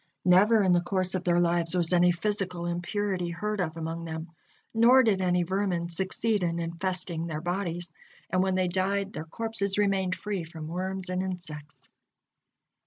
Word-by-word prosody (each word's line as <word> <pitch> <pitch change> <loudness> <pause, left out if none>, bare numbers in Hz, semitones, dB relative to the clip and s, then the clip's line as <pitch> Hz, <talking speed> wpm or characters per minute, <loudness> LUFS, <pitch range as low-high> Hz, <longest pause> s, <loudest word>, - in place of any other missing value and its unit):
Never 205 +4 +5
in 185 -2 +4
the 175 - +3
course 185 0 -1
of 185 -1 -1
their 175 -1 +3
lives 170 0 +3
was 175 0 +1
any 175 0 +5
physical 185 -1 -2
impurity 180 +1 -2
heard 210 +5 -3
of 165 -2 -3
among 165 +1 -4
them, 160 0 -6 0.4
nor 240 +3 +6
did 205 -5 +2
any 180 -1 +2
vermin 180 -2 -1
succeed 195 +4 0
in 170 -1 0
infesting 170 0 -2
their 155 -2 -3
bodies, 175 -1 -3 0.4
and 185 +1 +2
when 190 0 +1
they 185 -1 +2
died, 195 +2 -1
their 155 - -5
corpses 200 +1 -1
remained 195 -3 +1
free 200 -4 -4
from 160 -1 -8
worms 185 +2 -3
and 185 0 -1
insects. 160 -6 -7
180 Hz, 170 wpm, -28 LUFS, 170-195 Hz, 0.4 s, nor